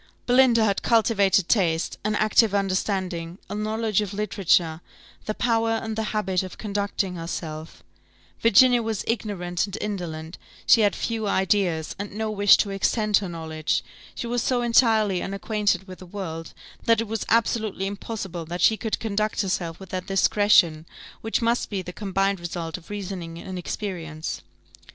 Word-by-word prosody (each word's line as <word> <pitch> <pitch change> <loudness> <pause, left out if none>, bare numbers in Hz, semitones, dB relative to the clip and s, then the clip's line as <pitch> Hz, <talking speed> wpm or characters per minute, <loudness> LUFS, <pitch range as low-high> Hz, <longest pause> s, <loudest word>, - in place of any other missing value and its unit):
Belinda 245 -2 +5
had 200 -2 0
cultivated 205 -5 +3
taste, 170 -6 +1
an 215 0 0
active 215 0 +3
understanding, 185 -3 -1
a - - -2
knowledge 215 0 0
of 200 -1 -4
literature, 180 -6 +1 0.4
the 215 - -2
power 225 -1 +1
and 225 -1 -3
the 220 0 -2
habit 195 -4 0
of 185 -1 -8
conducting 200 -2 -2
herself; 160 - -6 0.6
Virginia 240 +2 +6
was 225 -3 -2
ignorant 195 -5 -2
and 200 +1 -6
indolent, 170 -5 -5 0.3
she 230 - +6
had 205 -2 +3
few 225 -2 -2
ideas, 190 -5 +1
and 200 -1 -5
no 220 +1 -2
wish 205 -1 +6
to 200 - 0
extend 210 +1 +2
her 195 -3 -3
knowledge; 160 -2 -2 0.3
she - - -4
was 240 0 -1
so 245 0 +1
entirely 220 -5 +3
unacquainted 200 0 -1
with 185 -1 -10
the 185 - -11
world, 165 -4 -6 0.3
that 230 -1 +4
it 230 - -2
was 220 0 -3
absolutely 220 -4 +1
impossible 195 -4 -5
she 220 +4 +4
could 220 -1 -2
conduct 215 -1 -1
herself 175 -4 -2
with 190 -2 -11
that 185 0 -4
discretion, 195 -5 +3 0.3
which 225 +1 -1
must 235 +1 +1
be 195 -3 -3
the 180 - -8
combined 195 -1 0
result 170 -1 -5
of 175 -2 -11
reasoning 185 -5 -5
and 185 +2 -6
experience. 170 -5 -5
200 Hz, 155 wpm, -24 LUFS, 180-220 Hz, 0.6 s, Virginia